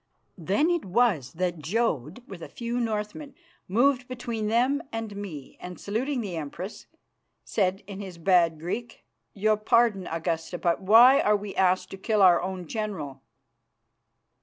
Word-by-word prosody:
Then 205 Hz, -, +1 dB
it 345 Hz, -2 st, 0 dB
was 190 Hz, -, +1 dB
that 175 Hz, 0 st, -2 dB
Jodd, 185 Hz, -, -2 dB
with 185 Hz, -3 st, -10 dB
a -, -, -8 dB
few 235 Hz, +1 st, -4 dB
Northmen, 225 Hz, +5 st, -3 dB, 0.3 s
moved 250 Hz, +5 st, +2 dB
between 235 Hz, -4 st, -4 dB
them 250 Hz, +6 st, +2 dB
and 225 Hz, -2 st, -5 dB
me, 175 Hz, -9 st, -8 dB
and, 180 Hz, 0 st, -8 dB
saluting 245 Hz, +6 st, -2 dB
the 190 Hz, -6 st, -5 dB
Empress, 165 Hz, +6 st, -7 dB, 0.6 s
said 190 Hz, -2 st, -1 dB
in 200 Hz, 0 st, -8 dB
his 185 Hz, -3 st, -8 dB
bad 170 Hz, -2 st, +3 dB
Greek, 225 Hz, +8 st, -5 dB, 0.3 s
"Your 215 Hz, +1 st, +2 dB
pardon, 215 Hz, -3 st, +2 dB
Augusta, 165 Hz, +1 st, -3 dB
but 170 Hz, +1 st, 0 dB
why 235 Hz, +7 st, +7 dB
are 210 Hz, 0 st, +3 dB
we 205 Hz, -1 st, -7 dB
asked 185 Hz, 0 st, +2 dB
to 195 Hz, -, -7 dB
kill 210 Hz, +1 st, +1 dB
our 180 Hz, -2 st, +6 dB
own 185 Hz, -1 st, -4 dB
general?" 190 Hz, -, -5 dB
200 Hz, 150 wpm, -26 LUFS, 180-235 Hz, 0.6 s, why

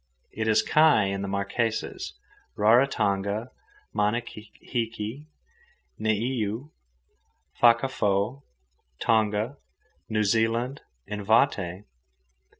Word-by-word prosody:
It 110 Hz, 0 st, -3 dB
is 110 Hz, -, +4 dB
kai 155 Hz, -8 st, +5 dB
in 100 Hz, 0 st, -2 dB
the 100 Hz, -, -3 dB
Marquesas, 100 Hz, +3 st, -2 dB, 0.4 s
Raratonga, 105 Hz, -2 st, +2 dB, 0.4 s
Manahiki, 115 Hz, +3 st, -3 dB, 0.7 s
Niuë, 110 Hz, +4 st, -1 dB, 0.9 s
Fakaafo, 120 Hz, -1 st, +2 dB, 0.6 s
Tonga, 110 Hz, +3 st, +1 dB, 0.5 s
New 110 Hz, -1 st, +1 dB
Zealand, 115 Hz, +5 st, +1 dB, 0.2 s
and 105 Hz, 0 st, -5 dB
Vaté. 100 Hz, -4 st, +2 dB
110 Hz, 70 wpm, -26 LUFS, 105-120 Hz, 0.9 s, kai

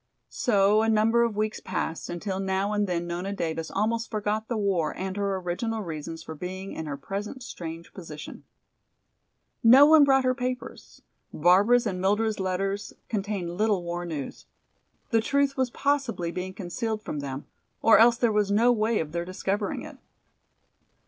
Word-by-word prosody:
So 210 Hz, -2 st, +3 dB
a 225 Hz, -, +1 dB
number 225 Hz, +2 st, +3 dB
of 230 Hz, -3 st, +1 dB
weeks 215 Hz, +1 st, -1 dB
passed, 170 Hz, -3 st, -4 dB
until 190 Hz, +2 st, -3 dB
now 195 Hz, +1 st, 0 dB
and 205 Hz, -1 st, +1 dB
then 175 Hz, -1 st, -1 dB
Nona 175 Hz, +3 st, -3 dB
Davis 165 Hz, -4 st, -3 dB
almost 225 Hz, +3 st, -1 dB
forgot 215 Hz, +1 st, -2 dB
the 235 Hz, -, -2 dB
war 195 Hz, -6 st, 0 dB
and 190 Hz, 0 st, -4 dB
her 200 Hz, -1 st, -1 dB
original 200 Hz, +5 st, -3 dB
reasons 165 Hz, -1 st, -6 dB
for 160 Hz, -, -7 dB
being 185 Hz, +4 st, -6 dB
in 160 Hz, -, -5 dB
her 140 Hz, -1 st, -4 dB
present 205 Hz, -, -6 dB
strange 165 Hz, -6 st, -8 dB
position. 155 Hz, -5 st, -9 dB, 1.2 s
No 255 Hz, +5 st, +9 dB
one 310 Hz, 0 st, +7 dB
brought 270 Hz, -1 st, +4 dB
her 255 Hz, 0 st, +2 dB
papers; 250 Hz, 0 st, -6 dB, 0.3 s
Barbara's 200 Hz, +9 st, +4 dB
and 185 Hz, -4 st, -2 dB
Mildred's 210 Hz, +3 st, +1 dB
letters 195 Hz, +2 st, -2 dB, 0.2 s
contained 200 Hz, -4 st, -2 dB
little 205 Hz, -2 st, +1 dB
war 175 Hz, 0 st, -4 dB
news. 155 Hz, -6 st, -6 dB, 0.6 s
The 225 Hz, -1 st, +4 dB
truth 275 Hz, +3 st, +1 dB
was 260 Hz, -1 st, 0 dB
possibly 270 Hz, -11 st, -1 dB
being 185 Hz, +1 st, -5 dB
concealed 215 Hz, +4 st, -3 dB
from 150 Hz, -, -4 dB
them, 140 Hz, 0 st, -5 dB, 0.4 s
or 225 Hz, -, +7 dB
else 235 Hz, +1 st, +6 dB
there 235 Hz, -2 st, +2 dB
was 210 Hz, -1 st, +1 dB
no 225 Hz, +4 st, +4 dB
way 225 Hz, -1 st, +1 dB
of 155 Hz, -2 st, -3 dB
their 170 Hz, +1 st, -2 dB
discovering 195 Hz, +3 st, -2 dB
it. -, -, -10 dB
200 Hz, 165 wpm, -26 LUFS, 175-225 Hz, 1.2 s, No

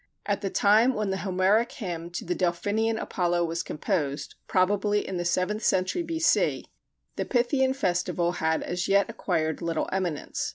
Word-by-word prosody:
At 205 Hz, -1 st, -1 dB
the 195 Hz, -, -2 dB
time 220 Hz, +7 st, +4 dB
when 210 Hz, -2 st, -1 dB
the 190 Hz, -, -1 dB
Homeric 195 Hz, +4 st, +1 dB
Hymn 170 Hz, -4 st, -5 dB
to -, -, -4 dB
the 180 Hz, -, 0 dB
Delphinian 205 Hz, +6 st, 0 dB
Apollo 175 Hz, -1 st, 0 dB
was 165 Hz, 0 st, -2 dB
composed 150 Hz, -4 st, -2 dB
(probably 205 Hz, +2 st, +1 dB
in 190 Hz, -, -3 dB
the 175 Hz, -, -2 dB
seventh 185 Hz, +5 st, 0 dB
century 185 Hz, -, +1 dB
B.C.), 330 Hz, 0 st, +1 dB, 0.5 s
the -, -, -1 dB
Pythian 265 Hz, +1 st, +1 dB
festival 175 Hz, -6 st, 0 dB
had 160 Hz, -2 st, 0 dB
as 175 Hz, 0 st, -2 dB
yet 200 Hz, +3 st, +3 dB
acquired 165 Hz, -8 st, -1 dB
little 165 Hz, -2 st, -1 dB
eminence. 180 Hz, -6 st, -2 dB
185 Hz, 160 wpm, -27 LUFS, 175-210 Hz, 0.5 s, time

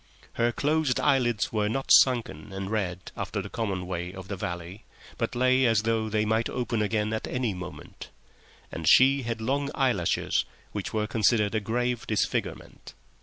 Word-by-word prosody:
Her 120 Hz, 0 st, +1 dB
closed 150 Hz, +1 st, +1 dB
eyelids 120 Hz, -8 st, +1 dB
were 105 Hz, -1 st, +1 dB
not 135 Hz, +4 st, -2 dB
sunken 115 Hz, -, +4 dB
and 95 Hz, +1 st, -5 dB
red 95 Hz, -5 st, -3 dB
after -, -, -3 dB
the -, -, -6 dB
common 100 Hz, -5 st, -2 dB
way 90 Hz, 0 st, -4 dB
of 95 Hz, 0 st, -10 dB
the 100 Hz, -, -3 dB
valley, 90 Hz, +2 st, -6 dB, 0.4 s
but -, -, -2 dB
lay 130 Hz, +1 st, +3 dB
as 110 Hz, -2 st, +2 dB
though 110 Hz, -1 st, 0 dB
they 110 Hz, 0 st, +1 dB
might 110 Hz, +2 st, +1 dB
open 120 Hz, -3 st, -2 dB
again 105 Hz, 0 st, 0 dB
at 110 Hz, -, -3 dB
any 125 Hz, -4 st, -1 dB
moment; 90 Hz, -1 st, -9 dB, 0.6 s
and 80 Hz, -1 st, 0 dB
she 135 Hz, +2 st, +6 dB
had 115 Hz, -2 st, -3 dB
long 140 Hz, +5 st, -1 dB
eyelashes, 125 Hz, -, +1 dB, 0.3 s
which -, -, -4 dB
were 105 Hz, -1 st, 0 dB
considered 105 Hz, -1 st, +2 dB
a 110 Hz, -, +1 dB
grave 120 Hz, +3 st, -2 dB
disfigurement. 105 Hz, -, -3 dB
110 Hz, 170 wpm, -27 LUFS, 100-125 Hz, 0.6 s, she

